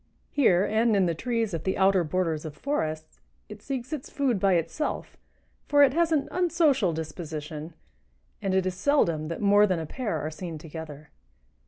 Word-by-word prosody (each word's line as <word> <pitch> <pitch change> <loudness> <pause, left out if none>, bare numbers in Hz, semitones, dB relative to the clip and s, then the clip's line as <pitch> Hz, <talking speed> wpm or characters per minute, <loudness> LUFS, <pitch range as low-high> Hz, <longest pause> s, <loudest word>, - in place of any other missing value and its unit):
Here 195 -9 +4
and 220 +1 +2
in 195 -2 +3
the 170 - +1
trees 230 +3 -2
at 165 - -3
the 190 - -1
outer 190 -1 +4
borders 165 -2 -1
of 150 -2 -8
forests 155 - -3 0.3
it 210 -1 -10
seeks 260 +2 -5
its 290 -4 -5
food 260 -7 0
by 195 0 +3
itself, 170 - -2 0.5
for 290 0 +5
it 265 -2 +4
has 335 +1 +2
an 295 -3 +1
unsocial 320 - +2
disposition, 155 -1 -6 0.7
and 190 -1 0
it 190 -1 +2
is 185 - -1
seldom 180 - +1
that 165 +4 -5
more 205 0 +5
than 185 -3 0
a 160 - -4
pair 215 - -3
are 155 +2 -4
seen 165 0 -6
together. 155 -2 -9
185 Hz, 180 wpm, -27 LUFS, 160-250 Hz, 0.7 s, for